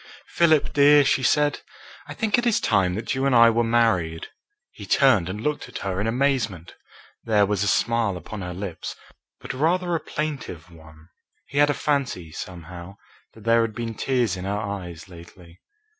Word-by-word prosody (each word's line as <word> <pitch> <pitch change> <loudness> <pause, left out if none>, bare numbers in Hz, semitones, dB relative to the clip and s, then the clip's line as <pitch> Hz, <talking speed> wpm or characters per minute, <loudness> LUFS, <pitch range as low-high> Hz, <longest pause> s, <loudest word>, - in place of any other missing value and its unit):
"Philip 160 -3 +2
dear," 145 0 +6
she 135 - +2
said, 145 +3 +2 0.5
"I - - -8
think 220 -2 +1
it 240 - -1
is 230 - +2
time 95 -4 +1
that 110 +2 -3
you 135 +1 0
and 135 - +2
I 115 0 +7
were 120 +1 +1
married." 110 -9 +1 0.4
He - - -11
turned 115 -11 +3
and 100 +3 -5
looked 150 +6 -3
at - - -7
her 95 0 -2
in 110 - -1
amazement. 115 - -1 0.5
There 105 -3 +3
was 100 -1 -1
a - - 0
smile 115 -2 +1
upon 100 +3 -8
her 90 0 -5
lips, 90 -2 -6 0.4
but - - -7
rather 175 +6 0
a 165 - +1
plaintive 140 - -5
one. 80 0 -17 0.4
He 140 - -3
had 145 0 +5
a 145 - +1
fancy, 125 - -2
somehow, 90 +2 -9 0.4
that 110 - -14
there 115 +1 +4
had 115 -2 -2
been 115 -1 -4
tears 120 -3 0
in 90 0 -7
her 100 +1 -2
eyes 95 -5 -6
lately. 85 -1 -15
110 Hz, 185 wpm, -24 LUFS, 90-135 Hz, 0.5 s, I